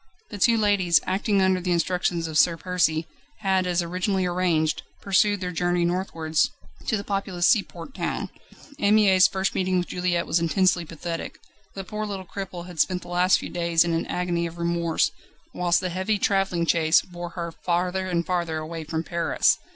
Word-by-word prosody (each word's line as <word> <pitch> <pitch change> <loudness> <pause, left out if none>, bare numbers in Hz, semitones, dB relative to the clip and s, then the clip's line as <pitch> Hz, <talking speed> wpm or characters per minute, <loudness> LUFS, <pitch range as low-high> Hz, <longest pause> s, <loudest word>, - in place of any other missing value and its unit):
The 205 - -6
two 230 +4 +4
ladies, 200 -6 +3
acting 195 +1 +1
under 190 -1 +2
the 180 0 -2
instructions 175 0 0
of 160 - -7
Sir 165 +1 +4
Percy, 165 -3 0 0.4
had 190 -2 +1
as 175 0 +1
originally 185 +2 -1
arranged, 175 -3 +1 0.2
pursued 200 +1 +2
their 180 -1 -3
journey 175 0 0
northwards, 165 -3 0 0.4
to 220 - +1
the 200 - -5
populous 195 -3 -1
seaport 205 0 0
town. - - -3 0.5
Anne 205 +1 +4
Mie's 190 -4 +6
first 190 0 -1
meeting 185 0 0
with 180 - 0
Juliette 180 -1 -1
was 170 - +1
intensely 175 +1 +2
pathetic. 165 +1 -6 0.4
The 195 - -5
poor 215 +3 -4
little 195 -2 -5
cripple 180 -2 -7
had 175 -3 -10
spent 180 +3 +1
the - - -12
last 180 +1 +3
few - - -7
days 170 -2 +2
in 170 -1 -1
an 165 - -1
agony 175 -1 -1
of 165 +1 -10
remorse, 170 -1 0 0.4
whilst 175 -1 +2
the 185 - -2
heavy 190 +4 -1
travelling 195 -4 +1
chaise 160 0 +3
bore 175 -1 -7
her 170 -1 -3
farther 180 +2 -1
and 170 -2 -1
farther 170 -3 -1
away 160 +1 -5
from 160 +1 -3
Paris. 170 0 +1
180 Hz, 180 wpm, -25 LUFS, 170-190 Hz, 0.5 s, Mie's